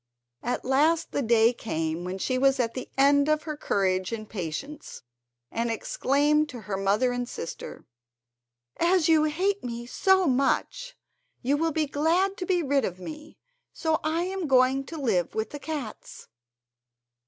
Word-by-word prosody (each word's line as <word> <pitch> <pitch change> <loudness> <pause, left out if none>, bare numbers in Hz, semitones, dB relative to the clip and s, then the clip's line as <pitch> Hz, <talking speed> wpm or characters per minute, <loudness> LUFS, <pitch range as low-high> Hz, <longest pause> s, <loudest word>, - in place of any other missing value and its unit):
At 245 - -3
last 300 +6 +2
the - - -1
day 230 -1 +4
came 160 -7 -3
when 185 +1 -4
she 255 +6 -1
was 270 0 +3
at 230 -2 0
the 255 - -6
end 285 +1 +4
of 305 0 +2
her 305 -2 -4
courage 190 -8 0
and 215 -2 -5
patience, 215 - -6 0.5
and 230 +1 -1
exclaimed 300 - +1
to 245 -2 -8
her 210 -2 -4
mother 200 +6 +1
and 245 0 -3
sister: 165 - -7 0.9
"As 345 -1 +3
you 315 -2 +5
hate 380 +6 0
me 235 -1 -5
so 380 +8 +3
much 285 - 0 0.5
you 270 +4 +2
will 325 +2 0
be 310 0 0
glad 330 +7 +1
to 360 - -4
be 360 -3 +2
rid 280 -1 +1
of 180 - -3
me, 305 +10 -9 0.4
so 320 -1 0
I 320 +2 0
am 375 -2 -3
going 265 0 +3
to 325 - -8
live 200 - 0
with 220 0 -2
the 290 - -6
cats!" 285 -7 -7
275 Hz, 165 wpm, -26 LUFS, 230-315 Hz, 0.9 s, you